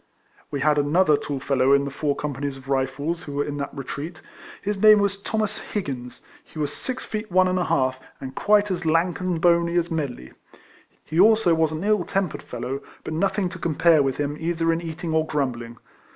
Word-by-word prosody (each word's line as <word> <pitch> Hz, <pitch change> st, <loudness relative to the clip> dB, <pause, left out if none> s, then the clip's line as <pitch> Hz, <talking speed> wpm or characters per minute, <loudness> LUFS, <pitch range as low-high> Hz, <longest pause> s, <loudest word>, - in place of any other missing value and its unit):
We 140 Hz, -, -3 dB
had 150 Hz, +1 st, +3 dB
another 150 Hz, +2 st, +3 dB
tall 145 Hz, -1 st, -4 dB
fellow 135 Hz, 0 st, +2 dB
in 140 Hz, 0 st, +3 dB
the 140 Hz, -, -4 dB
four 145 Hz, +1 st, -1 dB
companies 140 Hz, -1 st, -4 dB
of 135 Hz, -, -13 dB
Eifles 140 Hz, +5 st, -1 dB
who 145 Hz, -, -7 dB
were 145 Hz, 0 st, 0 dB
in 145 Hz, 0 st, -4 dB
that 140 Hz, -, -4 dB
retreat. 150 Hz, +4 st, -6 dB, 0.4 s
His 200 Hz, -1 st, -3 dB
name 215 Hz, 0 st, +8 dB
was 200 Hz, -1 st, 0 dB
Thomas 215 Hz, 0 st, -2 dB
Higgins; 125 Hz, -, -5 dB, 0.2 s
he -, -, -16 dB
was 150 Hz, -1 st, -2 dB
six 255 Hz, -, -4 dB
feet 215 Hz, -2 st, -5 dB
one 185 Hz, +1 st, +4 dB
and 185 Hz, 0 st, +1 dB
a 175 Hz, -, 0 dB
half, 130 Hz, -1 st, +1 dB, 0.2 s
and 130 Hz, -1 st, -7 dB
quite 205 Hz, +3 st, +3 dB
as 180 Hz, -, -2 dB
lank 165 Hz, +2 st, +1 dB
and 180 Hz, -2 st, -1 dB
bony 170 Hz, 0 st, +3 dB
as 175 Hz, 0 st, +1 dB
Medley. 135 Hz, -, -4 dB, 0.7 s
He 160 Hz, +2 st, -2 dB
also 215 Hz, -3 st, +5 dB
was 160 Hz, -1 st, +2 dB
an 155 Hz, +3 st, -4 dB
ill 210 Hz, -2 st, +2 dB
tempered 190 Hz, -1 st, -2 dB
fellow, 130 Hz, +3 st, -5 dB, 0.2 s
but -, -, -5 dB
nothing 190 Hz, +3 st, 0 dB
to 185 Hz, 0 st, -9 dB
compare 165 Hz, -1 st, +3 dB
with 135 Hz, -2 st, 0 dB
him 145 Hz, 0 st, -2 dB
either 165 Hz, 0 st, 0 dB
in 165 Hz, -, -2 dB
eating 165 Hz, 0 st, -5 dB
or 160 Hz, 0 st, +3 dB
grumbling. 120 Hz, -6 st, -3 dB
160 Hz, 205 wpm, -24 LUFS, 140-185 Hz, 0.7 s, name